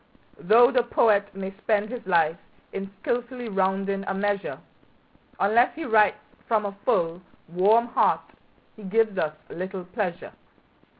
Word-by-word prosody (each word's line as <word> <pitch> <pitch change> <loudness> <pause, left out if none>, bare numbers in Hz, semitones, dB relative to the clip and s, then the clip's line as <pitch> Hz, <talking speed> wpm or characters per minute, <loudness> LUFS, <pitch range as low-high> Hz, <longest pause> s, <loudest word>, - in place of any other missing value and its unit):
Though 235 +7 +5
the 255 -2 +3
poet 215 -4 +2
may 195 0 -5
spend 215 -1 0
his 245 -2 -6
life 165 -1 +2 0.3
in 195 0 -5
skilfully 245 0 -3
rounding 195 0 0
a - - -1
measure, 205 0 -2 0.8
Unless 225 +5 +3
he 320 0 -5
writes 215 -3 +4 0.3
from 220 -2 +1
a 200 0 -4
full, 170 +1 +1 0.3
warm 200 +7 +3
heart 240 - +2 0.5
he 215 - -14
gives 210 0 +1
us 155 -2 -1 0.2
little 185 +1 -5
pleasure. 185 -2 -4
200 Hz, 135 wpm, -25 LUFS, 190-225 Hz, 0.8 s, Though